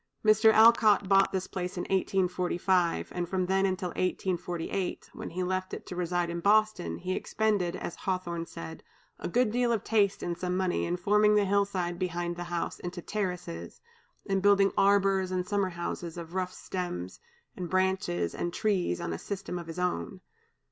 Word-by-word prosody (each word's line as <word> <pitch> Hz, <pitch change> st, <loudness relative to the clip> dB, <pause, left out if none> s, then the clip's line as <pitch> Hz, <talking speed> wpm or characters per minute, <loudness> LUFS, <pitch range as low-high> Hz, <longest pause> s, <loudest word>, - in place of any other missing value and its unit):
Mr. 215 Hz, +1 st, +6 dB
Alcott 220 Hz, -3 st, +6 dB
bought 195 Hz, 0 st, +4 dB
this 190 Hz, -1 st, -1 dB
place 180 Hz, -1 st, -5 dB
in 175 Hz, -, -1 dB
1845, 180 Hz, -2 st, +1 dB
and 175 Hz, -1 st, -3 dB
from 185 Hz, -1 st, 0 dB
then 190 Hz, +1 st, +2 dB
till 180 Hz, 0 st, -4 dB
1848, 180 Hz, 0 st, -2 dB
when -, -, -6 dB
he 185 Hz, +2 st, -3 dB
left 185 Hz, +1 st, -2 dB
it -, -, -10 dB
to 180 Hz, -, -7 dB
reside 175 Hz, 0 st, 0 dB
in 170 Hz, -, -3 dB
Boston, 205 Hz, -, +2 dB
he 185 Hz, -, -3 dB
expended, 205 Hz, -4 st, 0 dB
as -, -, -6 dB
Hawthorne 175 Hz, -3 st, -3 dB
said, 80 Hz, -1 st, -8 dB, 0.4 s
"a -, -, -3 dB
good 240 Hz, +4 st, +2 dB
deal 245 Hz, +1 st, +1 dB
of 225 Hz, -3 st, 0 dB
taste 205 Hz, -3 st, +2 dB
and 175 Hz, -, -2 dB
some 180 Hz, +1 st, -2 dB
money 185 Hz, -2 st, 0 dB
in 175 Hz, +1 st, -1 dB
forming 210 Hz, +3 st, +4 dB
the 205 Hz, -1 st, +4 dB
hill 200 Hz, +1 st, +3 dB
side 175 Hz, -3 st, -3 dB
behind 175 Hz, -1 st, -2 dB
the 175 Hz, 0 st, -5 dB
house 175 Hz, -1 st, -3 dB
into 175 Hz, 0 st, -6 dB
terraces, 180 Hz, -, -4 dB, 0.5 s
and 195 Hz, -1 st, 0 dB
building 200 Hz, 0 st, +5 dB
arbors 195 Hz, -1 st, +3 dB
and 185 Hz, -1 st, -2 dB
summer 200 Hz, -2 st, +1 dB
houses 175 Hz, -1 st, -5 dB
of 170 Hz, 0 st, -8 dB
rough 185 Hz, -1 st, -1 dB
stems, 95 Hz, -, -5 dB, 0.4 s
and 180 Hz, -2 st, -5 dB
branches, 185 Hz, -, 0 dB
and 175 Hz, -, -3 dB
trees, 185 Hz, -, 0 dB
on 85 Hz, -, -3 dB
a 80 Hz, -, -5 dB
system 195 Hz, -3 st, -5 dB
of 170 Hz, -, -9 dB
his 165 Hz, +1 st, -7 dB
own." 180 Hz, +1 st, -2 dB
185 Hz, 180 wpm, -29 LUFS, 175-195 Hz, 0.5 s, Mr